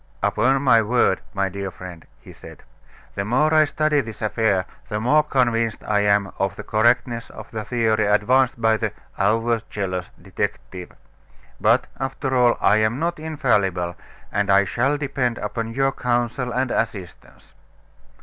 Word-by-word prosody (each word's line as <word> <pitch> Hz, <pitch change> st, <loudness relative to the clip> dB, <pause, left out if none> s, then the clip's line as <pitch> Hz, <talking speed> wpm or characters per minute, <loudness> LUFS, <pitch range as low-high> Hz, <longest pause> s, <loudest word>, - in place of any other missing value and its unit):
"Upon 130 Hz, +6 st, +2 dB
my 115 Hz, -4 st, +5 dB
word, 110 Hz, -4 st, +1 dB
my 100 Hz, -2 st, -1 dB
dear 100 Hz, 0 st, -5 dB
friend," 90 Hz, -2 st, -11 dB
he -, -, -14 dB
said, -, -, -13 dB, 0.5 s
"the 100 Hz, -, -3 dB
more 130 Hz, +9 st, +2 dB
I 155 Hz, -1 st, +6 dB
study 150 Hz, 0 st, +1 dB
this 110 Hz, -3 st, -9 dB
affair, 105 Hz, -3 st, +1 dB, 0.2 s
the 105 Hz, -, -2 dB
more 125 Hz, +7 st, +4 dB
convinced 120 Hz, -6 st, 0 dB
I 105 Hz, -1 st, +1 dB
am 100 Hz, -2 st, +2 dB
of 95 Hz, 0 st, -1 dB
the 105 Hz, -, -8 dB
correctness 115 Hz, +2 st, +1 dB
of -, -, -11 dB
the 110 Hz, -1 st, -4 dB
theory 110 Hz, -2 st, +1 dB
advanced 125 Hz, +5 st, +2 dB
by 110 Hz, -1 st, +3 dB
the -, -, -3 dB, 0.3 s
'overzealous' 105 Hz, -4 st, -1 dB
detective. 90 Hz, -1 st, -5 dB, 0.7 s
But, -, -, +3 dB
after 135 Hz, 0 st, -2 dB
all, 120 Hz, -1 st, +4 dB
I 105 Hz, -, +4 dB
am 110 Hz, +3 st, +1 dB
not 170 Hz, +2 st, -2 dB
infallible, 105 Hz, -, 0 dB, 0.4 s
and 100 Hz, -1 st, 0 dB
I 100 Hz, 0 st, +5 dB
shall 130 Hz, +9 st, 0 dB
depend 135 Hz, -4 st, -2 dB
upon 115 Hz, +2 st, -4 dB
your 135 Hz, 0 st, +2 dB
counsel 125 Hz, 0 st, -1 dB
and 125 Hz, +1 st, -1 dB
assistance." 100 Hz, -6 st, -5 dB
115 Hz, 150 wpm, -22 LUFS, 100-130 Hz, 0.7 s, I